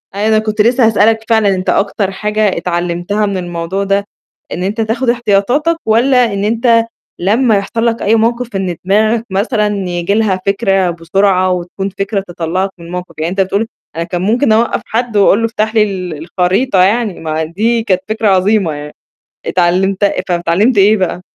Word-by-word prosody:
أي 205 Hz, +2 st, 0 dB
أنا 220 Hz, 0 st, +3 dB
كنت 215 Hz, 0 st, -1 dB
لسه 240 Hz, +2 st, +3 dB
هاسألك 220 Hz, +1 st, +2 dB
فعلًا، 220 Hz, -3 st, +3 dB
أنت 185 Hz, 0 st, -3 dB
أكتر 200 Hz, -1 st, 0 dB
حاجة 210 Hz, 0 st, -1 dB
اتعلّمتها 175 Hz, +4 st, -1 dB
من 200 Hz, -2 st, -2 dB
الموضوع 175 Hz, +2 st, -3 dB
ده 200 Hz, 0 st, 0 dB, 0.5 s
إن 180 Hz, -, -4 dB
أنت 205 Hz, +4 st, -2 dB
تاخُد 230 Hz, +3 st, -1 dB
احتياطاتك 240 Hz, +8 st, +1 dB
والّا 240 Hz, +1 st, +3 dB
إن 200 Hz, 0 st, -2 dB
أنت 230 Hz, +1 st, +2 dB, 0.3 s
لمّا 220 Hz, +5 st, +2 dB
يحصل 225 Hz, +4 st, -2 dB
لك 230 Hz, -1 st, 0 dB
أي 215 Hz, +3 st, +2 dB
موقِف 235 Hz, 0 st, -1 dB
إن 190 Hz, -2 st, -2 dB
دماغك 215 Hz, +4 st, +2 dB
مثلًا 210 Hz, +3 st, 0 dB, 0.2 s
ييجي 175 Hz, +2 st, -1 dB
لها 205 Hz, -3 st, +1 dB
فكرة 195 Hz, -2 st, +1 dB
بسرعة 185 Hz, +2 st, +1 dB
وتكون 180 Hz, +2 st, -3 dB
فكرة 195 Hz, +1 st, -2 dB
تطلّعك 175 Hz, +2 st, -2 dB
من 170 Hz, -, -12 dB
الموقِف، 180 Hz, +1 st, -7 dB
يعني 160 Hz, +2 st, -2 dB
أنت 195 Hz, +1 st, 0 dB
بتقول 200 Hz, +4 st, -1 dB, 0.3 s
أنا 165 Hz, -, -2 dB
كان 175 Hz, +1 st, -4 dB
ممكن 225 Hz, +6 st, +1 dB
أوقّف 225 Hz, +2 st, +2 dB
حد 230 Hz, -1 st, -2 dB
وأقول 200 Hz, +1 st, +4 dB
له 230 Hz, -, +1 dB
افتح 220 Hz, 0 st, -2 dB
لي 215 Hz, -, +5 dB
ال 185 Hz, -5 st, -4 dB, 0.2 s
الخريطة 185 Hz, +2 st, +2 dB
يعني 210 Hz, 0 st, 0 dB
ما 160 Hz, 0 st, -2 dB
دي 220 Hz, +8 st, 0 dB
كانت 185 Hz, -4 st, 0 dB
فكرة 220 Hz, 0 st, 0 dB
عظيمة 195 Hz, -1 st, +2 dB
يعني 150 Hz, 0 st, -8 dB, 0.5 s
اتعلّمت 185 Hz, +3 st, +1 dB
فب 200 Hz, -, +3 dB, 0.3 s
اتعلّمت 195 Hz, +8 st, +1 dB
إيه 205 Hz, +3 st, +5 dB
بقى؟ 185 Hz, -2 st, -2 dB
200 Hz, 175 wpm, -14 LUFS, 185-225 Hz, 0.5 s, لي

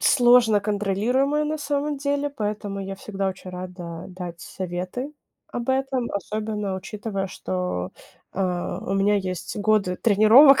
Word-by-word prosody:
сложно 240 Hz, -4 st, +6 dB
контролируемая 215 Hz, +9 st, +1 dB
на 310 Hz, +1 st, -1 dB
самом 290 Hz, 0 st, -1 dB
деле, 285 Hz, +1 st, 0 dB
поэтому 210 Hz, -5 st, -3 dB
я 195 Hz, 0 st, -4 dB
всегда 195 Hz, -1 st, -2 dB
очень 185 Hz, 0 st, -7 dB
рада 180 Hz, -2 st, -7 dB
дать 180 Hz, -2 st, -7 dB
советы 185 Hz, -, -4 dB, 0.4 s
об 240 Hz, 0 st, -5 dB
этом. 265 Hz, -2 st, 0 dB
Особенно 210 Hz, -1 st, -2 dB
учитывая, 195 Hz, 0 st, -4 dB
что, 180 Hz, -, -3 dB, 0.4 s
а, 180 Hz, -2 st, -1 dB
у -, -, -2 dB
меня 195 Hz, +1 st, +3 dB
есть 185 Hz, -2 st, -3 dB
годы 205 Hz, -3 st, +2 dB
тренировок 230 Hz, +8 st, +7 dB
205 Hz, 130 wpm, -24 LUFS, 185-250 Hz, 0.4 s, тренировок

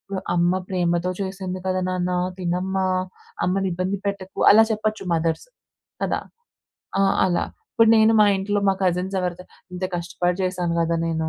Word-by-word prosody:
ఓహ్! 190 Hz, -, -3 dB
అమ్మ 175 Hz, +1 st, +2 dB
ప్రేమతో 175 Hz, -1 st, 0 dB
చేసింది 190 Hz, -1 st, -4 dB
కద 185 Hz, -, 0 dB
నాన్నా! 180 Hz, 0 st, -1 dB, 0.2 s
తినమ్మా! 185 Hz, +2 st, -1 dB, 0.6 s
అమ్మనిబ్బంది 185 Hz, +1 st, -1 dB
పెట్టకు. 195 Hz, -1 st, -5 dB
అలా 220 Hz, +2 st, +7 dB
చెప్పచ్చు 215 Hz, -1 st, -2 dB
మదర్స్. 165 Hz, -, -1 dB, 0.6 s
కదా! -, -, 0 dB, 0.8 s
ఆ! -, -, +4 dB, 0.2 s
అలా. 175 Hz, -2 st, +1 dB, 0.3 s
ఇప్పుడు 225 Hz, -1 st, +4 dB
నేను 220 Hz, +1 st, +5 dB
మా -, -, +8 dB
ఇంట్లో 205 Hz, +2 st, -1 dB
మా -, -, +5 dB
కజిన్స్ 185 Hz, +1 st, 0 dB
ఎవరితోనైనా, 180 Hz, 0 st, -5 dB, 0.2 s
ఇంత 185 Hz, +1 st, -3 dB
కష్టపడి 175 Hz, +1 st, -1 dB
చేశాను 180 Hz, -2 st, -1 dB
కదా 165 Hz, 0 st, +1 dB
నేను! 160 Hz, -1 st, -1 dB
185 Hz, 145 wpm, -23 LUFS, 175-195 Hz, 0.8 s, మా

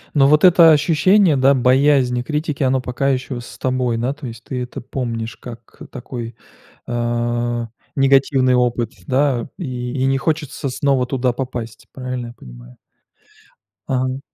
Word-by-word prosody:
Но 135 Hz, -2 st, +5 dB
вот 150 Hz, +1 st, +4 dB
это 170 Hz, -3 st, +7 dB
ощущение, 160 Hz, +2 st, +4 dB
да, 135 Hz, +1 st, +4 dB
боязни 130 Hz, -1 st, +3 dB
критики, 150 Hz, +1 st, -2 dB
оно 130 Hz, 0 st, +1 dB
пока 130 Hz, +2 st, -1 dB
еще 130 Hz, -1 st, -2 dB
с 120 Hz, -, -12 dB
тобой, 125 Hz, -2 st, -1 dB
да, 125 Hz, +4 st, -1 dB
то 145 Hz, -2 st, -9 dB
есть 115 Hz, -1 st, -10 dB
ты 125 Hz, -2 st, -4 dB
это 125 Hz, -, -8 dB
помнишь 115 Hz, -3 st, -4 dB
как 120 Hz, -2 st, -12 dB
такой, 120 Hz, -3 st, -7 dB, 0.5 s
э, 120 Hz, 0 st, -1 dB, 0.3 s
негативный 135 Hz, -1 st, +3 dB
опыт, 120 Hz, -2 st, +1 dB, 0.2 s
да. 130 Hz, -3 st, +1 dB
И 125 Hz, -7 st, -4 dB
и -, -, +2 dB
не 135 Hz, 0 st, +1 dB
хочется 150 Hz, -1 st, -2 dB
снова 135 Hz, -1 st, +1 dB
туда 125 Hz, -1 st, 0 dB
попасть. 120 Hz, -3 st, -6 dB
Правильно 125 Hz, -2 st, -5 dB
я 120 Hz, -, -10 dB
понимаю? -, -, -14 dB, 1.1 s
Ага. 130 Hz, 0 st, -1 dB
130 Hz, 145 wpm, -19 LUFS, 120-140 Hz, 1.1 s, это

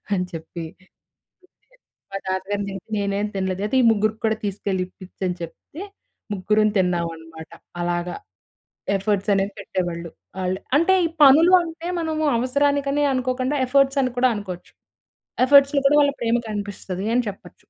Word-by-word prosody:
అని 180 Hz, -1 st, -1 dB
చెప్పి, 165 Hz, +1 st, -7 dB, 0.2 s
తిట్టేది. 185 Hz, -, -25 dB, 1.2 s
మా 195 Hz, -, -3 dB
తాతగారయితే 195 Hz, 0 st, -3 dB
నేనేం 200 Hz, +1 st, -1 dB
తినలేదు, 190 Hz, 0 st, -2 dB
అయితే 225 Hz, -, -2 dB
ఈ -, -, +2 dB
ముగ్గురికి 215 Hz, +1 st, 0 dB
కూడా 220 Hz, 0 st, +2 dB
తీసుకెళ్ళి 195 Hz, -1 st, -2 dB
ఇప్పిచు 185 Hz, 0 st, -15 dB
అని 180 Hz, -, -2 dB
చెప్తే, 225 Hz, -, -9 dB, 0.5 s
ముగ్గురుం 210 Hz, +3 st, +2 dB
తిన్నామన్నమాట. 165 Hz, -3 st, -3 dB, 0.3 s
అలాగా. 175 Hz, 0 st, -2 dB, 0.8 s
ఎఫర్ట్స్ 200 Hz, +1 st, -1 dB
అనేవి 195 Hz, +1 st, 0 dB
పెట్టేవాళ్ళు 175 Hz, -4 st, -4 dB, 0.3 s
వాళ్ళు. 185 Hz, 0 st, -1 dB, 0.2 s
అంటే 335 Hz, +5 st, +4 dB
ఈ -, -, -1 dB
పనులు 310 Hz, +6 st, +7 dB
అంటే 330 Hz, 0 st, -7 dB
మనము 315 Hz, -1 st, -1 dB
అవసరానికనే 280 Hz, +2 st, +1 dB
అనుకోకుండా, 255 Hz, +2 st, -1 dB
ఎఫర్ట్స్ 275 Hz, +1 st, +3 dB
అని 255 Hz, -1 st, -1 dB
కూడా 255 Hz, 0 st, +4 dB
అనుకోవచ్చు. 185 Hz, -4 st, -8 dB, 0.7 s
ఎఫర్ట్స్‌లో 280 Hz, +1 st, +5 dB
కూడా 295 Hz, +1 st, +4 dB
వాళ్ళ 285 Hz, 0 st, +3 dB
ప్రేమ 235 Hz, 0 st, +2 dB
కనిపిస్తది 200 Hz, -1 st, -5 dB
అని 245 Hz, -2 st, +2 dB
చెప్పొచ్చు. 200 Hz, -, -12 dB
205 Hz, 135 wpm, -22 LUFS, 185-270 Hz, 1.2 s, పనులు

